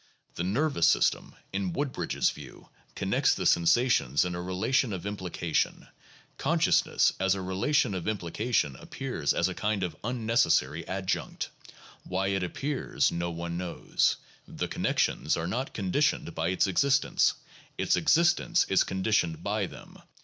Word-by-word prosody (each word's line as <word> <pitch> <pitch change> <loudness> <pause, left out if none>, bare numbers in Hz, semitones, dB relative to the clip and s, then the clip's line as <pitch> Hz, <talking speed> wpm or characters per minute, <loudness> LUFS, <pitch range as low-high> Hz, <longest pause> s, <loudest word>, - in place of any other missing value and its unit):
The 85 - -3
nervous 105 - +1
system, - - +1 0.2
in 95 -2 -2
Wood 140 -1 -1
bridge's - - 0
view, - - -12 0.3
connects - - +2
the - - -3
sensations 85 - +3
in 90 - -3
a 85 - -4
relation 105 +6 0
of 95 0 -5
implication; 90 -5 -2 0.5
consciousness - - +2
as 95 0 +2
a 95 - -4
relation 100 +6 +1
of 90 -3 -4
implication 105 - -1
appears 125 - -3
as 85 - +1
a 95 - -3
kind 105 0 -1
of 90 - -3
unnecessary 110 - +1
adjunct; 95 0 -3 0.5
why 95 +2 -1
it 95 -1 0
appears 135 - -1
no 85 0 -2
one 85 0 -4
knows; 90 -2 0 0.3
the - - -4
connec - - -2
tions - - +1
are 80 - -2
not 120 +10 -3
conditioned 100 - 0
by 80 0 -1
its 90 +1 +2
existence; 140 +9 +2 0.4
its - - +2
existence 170 +1 +3
is 95 - +4
con 95 0 -4
ditioned 85 -7 +1
by - - -1
them. - - -13
95 Hz, 150 wpm, -28 LUFS, 85-120 Hz, 0.5 s, is